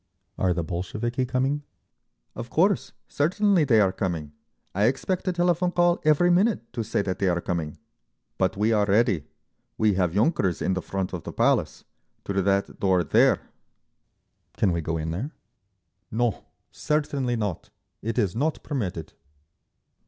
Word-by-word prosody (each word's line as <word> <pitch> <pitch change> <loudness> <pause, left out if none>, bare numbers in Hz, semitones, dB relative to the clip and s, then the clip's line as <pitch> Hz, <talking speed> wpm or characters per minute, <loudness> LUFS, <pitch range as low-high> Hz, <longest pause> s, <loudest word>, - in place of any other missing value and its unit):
"Are 90 - +1
the 85 -1 -1
Bolsheviki 110 +9 -3
coming?" 135 +3 0 0.7
"Of 120 +1 -7
course. 190 - +2 0.2
Certainly, 185 +3 +2
they 115 -5 +4
are 95 -3 +4
coming. 85 -7 -3 0.4
I 100 +3 +2
expect 175 - -1
a - - +3
telephone 175 0 +1
call 175 -1 +2
every 155 +4 +4
minute 180 - +1
to 120 -2 -2
say 105 -2 -1
that 95 -2 -3
they 100 - +1
are 85 0 +1
coming. 85 -3 -3 0.6
But - - +1
we 110 +2 +2
are 105 -2 +2
ready. 100 - +2 0.5
We 110 -1 +3
have 90 -3 +1
yunkers 100 - +2
in 95 - 0
the 95 - -2
front 95 0 -3
of 90 - -4
the - - -6
Palace. - - +1 0.4
Through 100 -1 0
that 100 +1 0
door 95 -2 +3
there." 75 - +4 1.2
"Can 100 - +2
we 85 -1 -1
go 80 +1 -2
in 80 0 -3
there?" 120 - -4 0.8
"No. 115 -1 -1 0.3
Certainly 145 -5 -1
not. 105 -7 -3 0.3
It 115 +2 -3
is 100 -6 +1
not 150 +6 -1
permitted." 90 - -4
110 Hz, 155 wpm, -25 LUFS, 90-145 Hz, 1.2 s, they